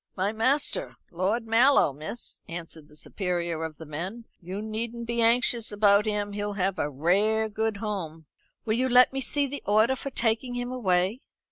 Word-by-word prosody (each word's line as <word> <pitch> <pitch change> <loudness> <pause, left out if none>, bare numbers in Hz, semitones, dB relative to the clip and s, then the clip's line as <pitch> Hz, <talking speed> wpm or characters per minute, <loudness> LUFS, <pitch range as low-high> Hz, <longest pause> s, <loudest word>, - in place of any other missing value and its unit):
"My 195 +2 0
master, 270 - 0 0.2
Lord 195 +7 -1
Mallow, 230 - +4
miss," 155 - -6
answered 165 -2 -8
the 150 - -19
superior 170 -1 -3
of 160 -2 -6
the 160 - -10
men. 180 +10 -6 0.2
"You 185 +3 -6
needn't 225 +2 -4
be 235 0 -1
anxious 235 0 +3
about 205 0 +4
him; 205 -1 -1
he'll 205 0 -3
have 195 -2 -1
a 145 - 0
rare 200 +10 +1
good 220 0 -2
home." 180 -7 -5 0.4
"Will 220 - +1
you 255 +3 +1
let 250 +1 +6
me 270 - -2
see 285 +2 +1
the 280 +1 -5
order 220 +5 +3
for 275 - -5
taking 245 0 -1
him 245 0 -3
away?" 190 -2 +1
215 Hz, 175 wpm, -27 LUFS, 180-235 Hz, 0.4 s, let